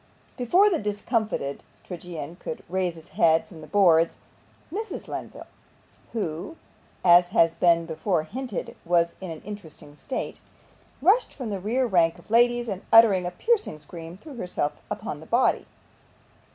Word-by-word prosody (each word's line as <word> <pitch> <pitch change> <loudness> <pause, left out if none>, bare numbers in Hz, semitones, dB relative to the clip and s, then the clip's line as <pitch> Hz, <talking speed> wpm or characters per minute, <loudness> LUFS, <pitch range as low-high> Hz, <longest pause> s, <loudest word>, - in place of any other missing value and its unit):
Before 345 - +4
the 375 -5 +2
discomfited 210 - -2 0.2
tragedian 175 -2 -7
could 160 - -6
raise 180 -1 -1
his 160 +1 -14
head 160 0 +3
from 165 -6 -13
the - - -11
boards, 170 -5 +4 0.6
Mrs. 435 +1 -5
Lenville - - -7 0.7
(who, 190 - -4 0.5
as 175 0 +7
has 165 -4 +3
been 170 -1 +3
before 165 +1 -1
hinted, 245 +5 -5
was 170 0 +2
in 185 - -6
an 160 -1 -7
interesting 165 -8 -10
state) 260 - -5 0.6
rushed 410 +9 +4
from 250 -6 -5
the 200 - -3
rear 235 +7 0
rank 175 -6 +3
of 175 - -17
ladies, 240 +1 +4
and 195 -3 -4
uttering 210 -6 +7
a - - -3
piercing 430 - 0
scream 165 +2 -10
threw 295 +8 -12
herself 180 -7 -2 0.2
upon - - -5
the - - -13
body. - - +2
185 Hz, 150 wpm, -25 LUFS, 165-230 Hz, 0.7 s, as